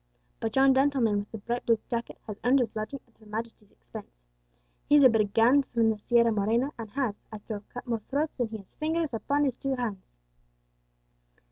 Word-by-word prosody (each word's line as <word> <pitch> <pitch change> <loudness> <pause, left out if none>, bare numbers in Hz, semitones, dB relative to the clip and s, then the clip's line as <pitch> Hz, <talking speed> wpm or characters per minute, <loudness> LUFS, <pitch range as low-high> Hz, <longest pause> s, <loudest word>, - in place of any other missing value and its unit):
But 225 -1 -3
yon 270 0 +6
gentleman 265 -6 +2
with 205 - -7
the 225 - -5
bright 240 +3 -3
blue 230 -1 +4
jacket 235 -1 -4
has 210 -1 -7
earned 250 +3 +4
his 240 -4 -1
lodging 220 +6 -4
at 235 - -32
Her 215 - -18
Majesty's 220 -1 -6
expense; - - -11 0.8
he 295 - +6
is 290 - +7
a 260 - +9
brigand 225 +5 +3
from 230 -2 +2
the 215 - -4
Sierra 235 +1 +3
Morena, 225 +6 +1
and 225 -2 -6
has, 255 -2 -1 0.2
I 215 - -6
trow, 210 0 -7
cut 245 - -8
more 230 -2 -2
throats 295 +3 -1
than 245 -3 -1
he 220 0 -6
has 195 -3 -15
fingers 320 -2 -1
upon 285 +6 0
his 260 -3 0
two 275 -1 -2
hands." 210 - -5
235 Hz, 205 wpm, -28 LUFS, 215-265 Hz, 0.8 s, a